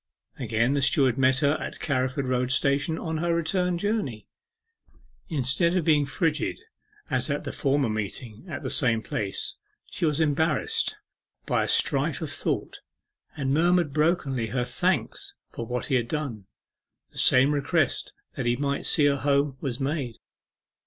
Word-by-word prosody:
Again 115 +1 +1
the 140 - +1
steward 135 -3 +3
met 130 0 +3
her 140 - +4
at - - -6
Carriford 130 -1 -1
Road 125 0 0
Station 140 +4 +1
on 160 -1 -3
her 170 0 +1
return 180 +2 0
journey. 190 - -2 1.0
Instead 160 +4 +2
of 170 - 0
being 150 -3 +3
frigid 155 +2 -1 0.5
as - - +1
at - - -1
the - - -4
former 140 -2 +1
meeting 110 +1 -4
at - - -5
the - - -2
same 115 -5 +3
place, 100 -2 -3 0.3
she - - -7
was 155 -2 +2
embarrassed 160 - +1 0.5
by - - +1
a - - -2
strife - - +1
of - - -4
thought, - - -3 0.6
and 135 -2 0
murmured 170 -1 +3
brokenly 150 -6 +1
her 125 +2 -1
thanks 120 - -1 0.2
for 115 - -6
what 125 +1 -2
he 140 - -3
had 120 -3 +2
done. 120 -10 -4 0.6
The - - -5
same 130 +3 +6
request 145 -2 0 0.2
that 125 - -2
he 120 - +3
might 140 +2 -1
see 150 - +4
her 140 -1 +3
home 140 0 +1
was 130 -3 -3
made. 135 -4 -2
140 Hz, 160 wpm, -26 LUFS, 125-155 Hz, 1.0 s, same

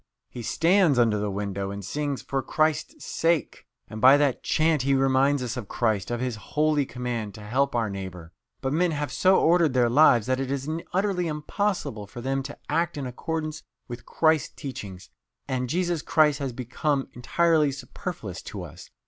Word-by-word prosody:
He 120 - -7
stands 170 - +3
under 115 -3 +3
the 105 0 -1
window 100 -1 -3
and 100 -1 -6
sings, 145 +5 -3
'For 135 -1 -2
Christ's 155 - -1
sa 165 - -2
ake!' 165 -6 0 0.2
and 110 - -8
by 130 +3 +8
that 145 -3 +1
chant 155 -2 +2
he 135 +1 +2
reminds 135 +1 +3
us 125 0 -4
of 115 -5 -5
Christ, 110 -5 0
of 120 -1 -2
His 125 -3 -2
holy 150 +5 0
command 120 -5 -4
to 110 - -10
help 130 +6 0
our 115 -2 +1
neighbour. 95 -4 -7 0.3
But 135 +1 -1
men 175 +3 +2
have 145 -3 -3
so 185 +8 +4
ordered 165 -4 +3
their 120 -2 +3
lives 125 -5 +5
that 130 0 0
it 135 -1 -2
is 140 0 -3 0.2
utterly 185 -2 0
impossible 150 - -2
for 120 - -10
them 135 +2 -1
to 140 +2 -8
act 165 +1 0
in 140 - -3
accordance 155 +4 -4 0.3
with 120 0 -8
Christ's 160 -3 +1
teaching, 105 -9 -7 0.5
and 125 -2 -2
Jesus 175 0 0
Christ 150 -3 +3
has 135 -2 -2
become 135 +3 -2
entirely 155 +4 +2
superfluous 135 - -6
to - - -7
us. - - -11
135 Hz, 180 wpm, -26 LUFS, 120-155 Hz, 0.5 s, by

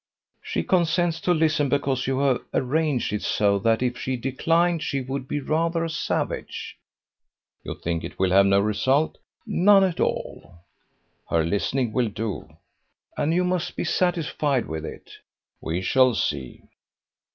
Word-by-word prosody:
"She - - -2
consents 170 -1 +1
to 180 - +1
listen, 155 -4 +2
because 135 -2 0
you 135 0 0
have 135 -3 +2
arranged 140 -3 0
it 105 - -1
so 100 -1 +1
that 115 +4 +2
if 125 -1 -1
she 130 0 -2
declined 165 +7 +1
she 140 - -1
would 130 0 -5
be 145 - -2
rather 165 +3 0
a 165 - -4
savage." 160 - -3 0.9
"You - - -6
think 85 0 -3
it - - -8
will 95 -1 +1
have 100 +1 +6
no 100 0 +4
result?" 130 +9 +1 0.3
"None 195 +2 +5
at 185 -3 0
all." - - -3 0.7
"Her 80 -1 +2
listening 110 +6 -1
will 120 -3 +1
do." 105 0 -5 0.7
"And 150 - 0
you 180 +2 +2
must 180 -1 -1
be - - -2
satisfied 150 -7 0
with 80 +1 -5
it." - - -10 0.5
"We 85 +3 -3
shall 130 +2 +4
see." 70 -8 -3
135 Hz, 150 wpm, -24 LUFS, 105-165 Hz, 0.9 s, have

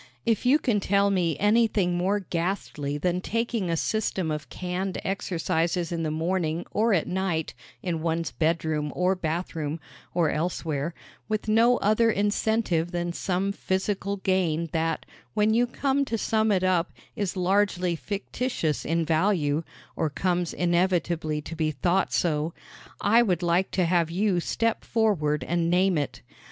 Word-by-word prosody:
If 230 +1 +1
you 275 +4 +6
can 240 -8 +1
tell 200 +1 +2
me 170 -6 +1
anything 210 -4 +3
more 190 +4 +1
ghastly 165 -5 -2
than 180 +4 0
taking 230 -3 -1
a 165 - +1
system 190 -4 -1
of 150 -1 -4
canned 185 +1 -3
exercises 175 -2 -1
in 170 -1 -2
the 160 - -1
morning 165 +1 -1
or 225 +2 +2
at 180 -6 +2
night 180 -4 -1 0.3
in 170 -4 -2
one's 165 0 -1
bedroom 155 -2 0
or 180 +1 +2
bathroom, 165 -3 -3 0.4
or 165 -4 +3
elsewhere, 160 -1 -2 0.3
with 215 0 -1
no 230 +3 +4
other 215 +3 +3
incentive 205 -4 +1
than 175 -1 -2
some 190 +2 -1
physical 200 +1 -2
gain 175 -4 0
that, 165 -1 -1 0.3
when 215 0 +3
you 240 +2 +3
come 275 +3 0
to 230 - -2
sum 220 0 +1
it 190 -2 +2
up, 180 -2 +2 0.2
is 200 -2 -2
largely 185 -1 +1
fictitious 200 - -2
in 165 +1 0
value 160 -2 +2 0.3
or 160 - 0
comes 175 +3 0
inevitably 170 -3 0
to 165 - -7
be 160 -1 0
thought 175 +6 +1
so 160 -1 0 0.5
I 225 +4 +5
would 180 -7 +1
like 175 +2 +2
to 185 - +2
have 170 -1 +2
you 185 +1 +1
step 230 +6 -1
forward 170 -10 +1
and 170 0 0
name 185 +1 +3
it. 145 - -3
180 Hz, 150 wpm, -26 LUFS, 165-200 Hz, 0.5 s, you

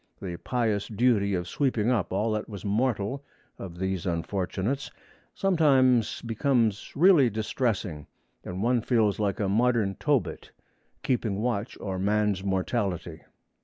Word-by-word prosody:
The 90 -3 -5
pious 110 -2 -1
duty 105 -3 +2
of 90 -1 -3
sweeping 125 -1 0
up 115 -7 0
all 105 +4 0
that 105 +1 -3
was 100 -2 -8
mortal 110 +4 0 0.4
of 90 -3 -8
these 95 -1 -2
unfortunates 95 +8 -2 0.5
sometimes 135 - +3
becomes 115 -2 0
really 160 -5 +6
distressing, 105 - -2 0.4
and 90 +2 -5
one 120 0 +2
feels 110 -4 +1
like 100 -2 -1
a 100 - 0
modern 110 -1 +2
Tobit, 145 -5 -1 0.5
keeping 120 -7 0
watch 115 -1 -2
o'er 95 -2 -4
man's 105 -1 +1
mortality. 95 -4 -2
105 Hz, 130 wpm, -27 LUFS, 95-125 Hz, 0.5 s, really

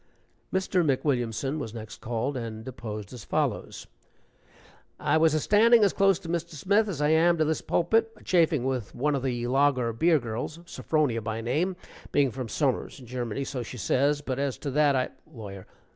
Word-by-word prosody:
Mr. 185 -1 +1
McWilliamson 135 -1 0
was 115 -5 -6
next 110 -1 -9
called, 120 +4 -2
and 115 -2 -5
deposed 110 -4 -7
as 120 - -9
follows: - - -2 1.1
"I - - +2
was 160 -1 +4
a - - +2
standing 225 +6 +5
as 200 - +3
close 195 -2 +4
to - - -9
Mr. 170 -1 -3
Smith 200 +8 +2
as 150 -6 -2
I 150 - +3
am 170 +2 +4
to 155 - +2
this 155 +1 0
pulpit, 225 +6 +1
a - - -17
chaffing 165 -6 +2
with 130 -5 -3
one 150 +4 +1
of 140 - -1
the 120 -2 -2
lager 130 -2 +2
beer 160 +7 +3
girls 120 +4 -4
Sophronia 150 -9 0
by 110 +1 -3
name, 155 +11 0 0.4
being 140 -3 +3
from 125 -1 -5
summers 135 +3 -1
in 130 - -12
Germany, 120 +1 -3
so 135 -2 -4
she 120 +2 -7
says, 140 +7 +1
but 135 -2 -3
as 140 -2 -1
to 140 - -4
that, 145 0 +3
I 130 -1 0 0.2
" - - -30
LAWYER. 100 -5 -9
140 Hz, 190 wpm, -27 LUFS, 120-160 Hz, 1.1 s, standing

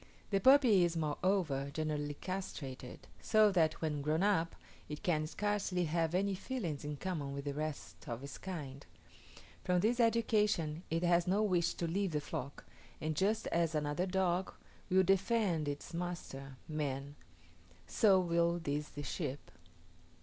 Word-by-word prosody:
The 195 - +3
puppy 250 -5 +6
is, 170 -1 +1
moreover, 155 -3 0
generally 150 -1 -2
castrated; 140 -9 -6 0.2
so 215 -1 +5
that, 160 -4 +2
when 150 -2 -1
grown 155 +5 +1
up, 180 -5 +2 0.3
it 150 0 -6
can 155 -3 +1
scarcely 195 -1 -1
have 165 +1 0
any 195 +2 +1
feelings 185 - -4
in 150 0 -4
common 150 -5 -3
with 140 0 -5
the 140 - -2
rest 155 -1 -5
of 120 +2 -4
its 140 -1 -8
kind. 145 -7 -6 0.8
From 180 0 +2
this 235 +5 +2
education 210 -9 +2
it 165 +2 0
has 175 0 +3
no 200 +4 +3
wish 180 -5 +1
to 170 - -2
leave 185 +1 -1
the 150 - +1
flock, 140 -1 -6 0.3
and 155 0 -2
just 210 +6 +1
as 165 -1 +1
another 150 +4 0
dog 185 -1 0 0.4
will 190 +1 +5
defend 195 -4 +2
its 145 +4 -5
master, 150 -6 -5
man, 145 -2 -3 0.7
so 200 -5 +4
will 170 -1 +2
these 150 -2 -3
the 145 - -7
sheep. 135 +1 -4
170 Hz, 150 wpm, -34 LUFS, 150-190 Hz, 0.8 s, puppy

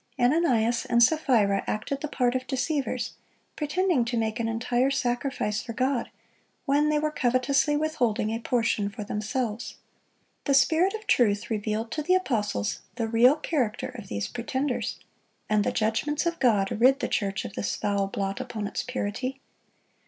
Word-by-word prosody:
Ananias 245 -4 +2
and 235 0 +4
Sapphira 235 -9 +3
acted 270 +6 -2
the 300 - -2
part 250 -4 +1
of 255 0 -3
deceivers, 280 +1 -1 0.4
pretending 325 -2 +1
to 240 0 -2
make 220 +1 -1
an 230 - 0
entire 240 +3 +1
sacrifice 245 -4 -1
for 230 - -7
God, 255 +1 0 0.6
when 295 +1 +3
they 305 - +2
were 305 0 0
covetously 270 +1 +2
withholding 250 -9 0
a 225 - -2
portion 230 -4 0
for 210 +1 -7
themselves. 215 +2 -3 0.7
The 280 - +3
Spirit 325 - +3
of 435 - -8
truth 205 -3 +2
revealed 220 +1 -2
to 305 - -2
the 360 +5 +3
apostles 210 - -1 0.2
the 230 -2 -1
real 235 +5 +5
character 275 -8 -1
of 225 -6 -9
these 100 - -3
pretenders, 260 +2 -2 0.5
and 210 -1 +2
the - - 0
judgments 280 +9 0
of 335 0 -1
God 205 -6 +3
rid 265 +3 +6
the - - -1
church 195 -3 -1
of - - -7
this - - -2
foul 200 -1 0
blot 195 +3 -3
upon 240 -5 -5
its - - -2
purity. 255 +2 -3
245 Hz, 160 wpm, -27 LUFS, 215-280 Hz, 0.7 s, rid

